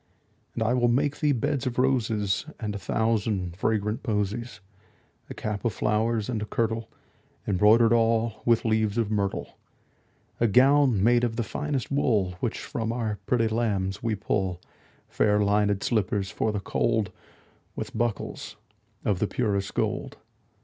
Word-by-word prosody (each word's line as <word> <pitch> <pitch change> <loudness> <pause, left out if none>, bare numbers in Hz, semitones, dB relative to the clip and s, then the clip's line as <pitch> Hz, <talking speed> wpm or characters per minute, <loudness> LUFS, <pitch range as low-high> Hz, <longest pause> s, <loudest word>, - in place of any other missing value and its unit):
And - - 0
I 110 +2 +2
will 120 -1 +3
make 140 +4 +1
thee 150 -2 +2
beds 130 +2 -1
of 125 - -3
roses 115 -4 +1
And 105 -2 -3
a 100 - -5
thousand 100 -3 -1
fragrant 105 +2 -1
posies; 110 0 -2 0.7
10 - - -33
A - - -5
cap 105 -2 -4
of 115 - 0
flowers, 110 0 0
and 115 -4 -2
a - - -2
kirtle 115 0 -2 0.6
Embroider'd 110 +4 +5
all 115 -1 +1
with 115 -1 +2
leaves 110 -1 +1
of 110 -2 0
myrtle. 100 -2 -2 0.8
A 115 - +3
gown 130 -2 +4
made 120 +2 +4
of 115 -2 0
the 120 - -1
finest 145 +2 -3
wool 110 -9 +2
Which 120 - -2
from 120 -5 -3
our 110 -3 -2
pretty 115 -2 +2
lambs 100 -4 -1
we 115 -2 0
pull; 95 -2 -1 0.5
Fair 105 0 +2
linèd 105 -1 +2
slippers 100 -3 0
for 110 - 0
the 105 - -2
cold, 110 +1 0
15 - - -28 0.5
With - - -6
buckles 120 -4 -3 0.5
of 100 -4 +1
the 105 - +1
purest 100 -5 -1
gold. - - -2
110 Hz, 155 wpm, -26 LUFS, 105-120 Hz, 0.8 s, Embroider'd